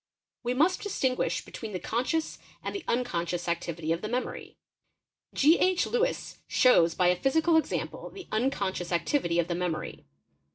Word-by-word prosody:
We 245 +1 -1
must 340 +7 +3
distinguish 260 -11 -1
between 220 -3 -7
the 185 - -2
conscious 255 - -1 0.2
and - - -3
the 395 - -5
unconscious 175 -8 -1
activity 170 -1 -2
of 165 - 0
the 215 - -4
memory. 250 +2 -4 0.8
G. 310 +5 +5
H. 370 -1 +3
LEwss - - -1
shows 170 -10 +4
by 180 -1 +3
a 180 - +4
physical 320 +5 +3
example 320 - -1
the 385 -2 -11
unconscious 200 -7 -1
activity 170 - +1
of 170 -1 +2
the 175 - -1
memory. 175 -2 -3
235 Hz, 155 wpm, -28 LUFS, -, 0.8 s, G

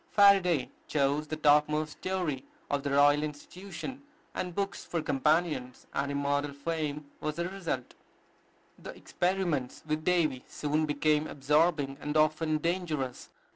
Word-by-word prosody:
Faraday 190 -8 +5 0.2
chose 145 +1 +1
the 155 - -3
topmost 150 0 +3
story 175 -8 -2 0.3
of 145 -1 +1
the 140 - -2
Royal 145 +1 +5
Institution, 180 - -7 0.3
and 180 -2 -4
books 200 0 -2
for 170 - -2
companions, 150 -3 0
and 140 0 -1
immortal 140 0 0
fame 150 0 -3
was 155 -1 -3
the 170 +1 -1
result. 175 -10 -4 0.9
The - - -9
experiments 175 -8 -1
with 155 0 -2
Davy 160 -7 +2
soon 150 +1 -1
became 150 +1 +2
absorbing, 145 0 +1
and 150 +1 -1
often 155 0 +2
dangerous. 155 -6 -2
155 Hz, 130 wpm, -30 LUFS, 145-170 Hz, 0.9 s, Faraday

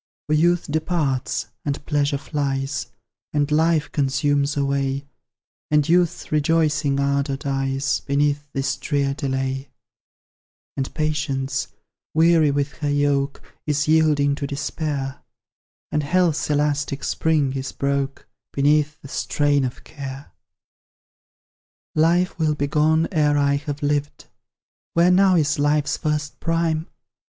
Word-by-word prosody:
For 150 - -1
youth 175 +3 +3
departs, 150 -4 -1
and 145 0 -3
pleasure 145 -2 +1
flies, 140 -2 -2 0.5
And 145 0 +1
life 160 0 +2
consumes 140 +1 +1
away, 140 0 0 0.6
And 150 -1 +3
youth's 175 0 +1
rejoicing 150 -2 +2
ardour 140 0 0
dies 135 -1 -1
Beneath 145 +1 0
this 135 0 -1
drear 140 -2 0
delay; 135 -1 -2 1.1
And 135 -1 -3
Patience, 145 -3 -1 0.5
weary 160 -1 +5
with 140 0 0
her 145 -2 -2
yoke, 145 -1 0 0.2
Is 150 -1 +1
yielding 155 -3 +3
to 140 - -3
despair, 140 -1 -3 0.7
And 150 - +1
Health's 165 +1 +1
elastic 145 -1 0
spring 150 -4 +1
is 135 -1 -4
broke 140 0 -2 0.3
Beneath 150 +2 +2
the - - -8
strain 140 +2 +1
of 125 -1 -4
care. 135 -2 -8 1.6
Life 170 +4 +2
will 155 -2 +2
be 145 - -1
gone 155 +2 +2
ere 150 -3 +2
I 140 0 +3
have 145 0 -5
lived; 145 0 -1 0.7
Where 170 +2 +5
now 190 0 +5
is 145 -3 +2
Life's 145 0 +2
first 150 -1 -2
prime? 165 -1 0
145 Hz, 120 wpm, -22 LUFS, 140-155 Hz, 1.6 s, weary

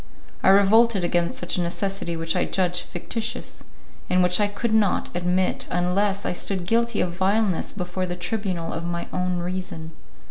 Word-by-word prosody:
I - - +4
revolted 200 +1 +5
against 175 0 0
such 175 - -1
a - - +1
necessity 175 0 -2
which 165 0 -1
I - - +2
judged 180 -2 0
fictitious, 225 +6 -4 0.5
and 180 0 +4
which 180 +1 +4
I 205 - +3
could 215 +3 -2
not 210 -5 +1
admit 180 +1 0
unless 195 +3 0
I - - 0
stood 185 0 -2
guilty 235 +2 +1
of 175 - 0
vileness 190 +1 +1
before 180 -1 -3
the 175 - -3
tribunal 180 -3 -3
of 165 - -4
my 170 0 -3
own 180 0 0
reason. 175 -2 -4
185 Hz, 170 wpm, -24 LUFS, 175-200 Hz, 0.5 s, revolted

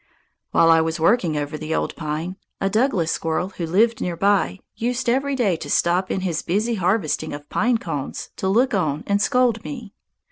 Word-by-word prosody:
While 165 - +5
I 165 0 +6
was 160 +1 -2
working 170 -3 +2
over 145 +1 -3
the 155 +1 -2
old - - -2
pine, 160 +4 -4 0.2
a 195 - 0
Douglas 215 -8 +1
squirrel 165 +3 -1
who 175 -3 -5
lived 225 +7 +2
near 175 -2 -2
by 200 0 +2 0.2
used 245 +2 -2
every 270 +3 +1
day 215 -9 +2
to 145 - -8
stop 180 +5 +2
in 190 - -1
his 175 -4 -1
busy 210 +7 0
harvesting 185 -6 0
of 145 0 -8
pine 240 +2 +2
cones 155 -10 -5
to 190 - -2
look 240 +7 +3
on 155 -6 0
and 200 0 +1
scold 245 -2 +2
me. 240 -8 -7
190 Hz, 190 wpm, -22 LUFS, 160-230 Hz, 0.2 s, I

